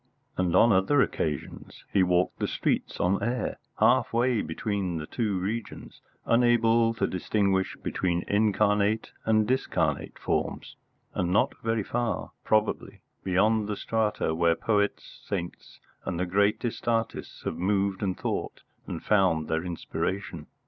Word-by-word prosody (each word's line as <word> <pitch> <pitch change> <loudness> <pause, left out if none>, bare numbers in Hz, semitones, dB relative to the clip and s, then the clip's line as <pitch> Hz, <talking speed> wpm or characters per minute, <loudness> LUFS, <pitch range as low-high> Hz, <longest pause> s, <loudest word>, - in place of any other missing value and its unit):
And 90 -2 0
on 115 +5 +6
other 100 +9 +3
occasions 75 -3 -4
he 100 - +4
walked 90 0 +2
the - - 0
streets - - -1
on 95 +2 +1
air, 125 +2 -2 0.2
half - - +3
way 120 -1 +2
between 95 +1 -2
the 75 - -4
two 105 +1 -1
regions, 105 +4 -5 0.2
unable 115 -1 +3
to - - +1
distinguish 95 +1 0
between 85 -1 -1
incarnate 105 0 +2
and 110 -1 +3
discarnate 85 - -1
forms, - - -2 0.4
and 90 -1 -1
not 100 +4 +3
very 115 -1 0
far, 120 +3 -2
probably, 110 0 0 0.2
beyond 105 +3 +2
the 105 -1 -3
strata 110 -7 0
where 85 0 +3
poets, 105 +2 -1
saints, 90 -4 -6 0.2
and 85 - -3
the 90 - +1
greatest 100 +6 0
artists 115 -1 -2
have - - -3
moved 95 +1 0
and 95 -3 -1
thought - - -4 0.2
and - - -5
found 95 -7 +2
their 80 +1 -1
inspiration. 85 -1 -4
100 Hz, 135 wpm, -27 LUFS, 90-110 Hz, 0.4 s, on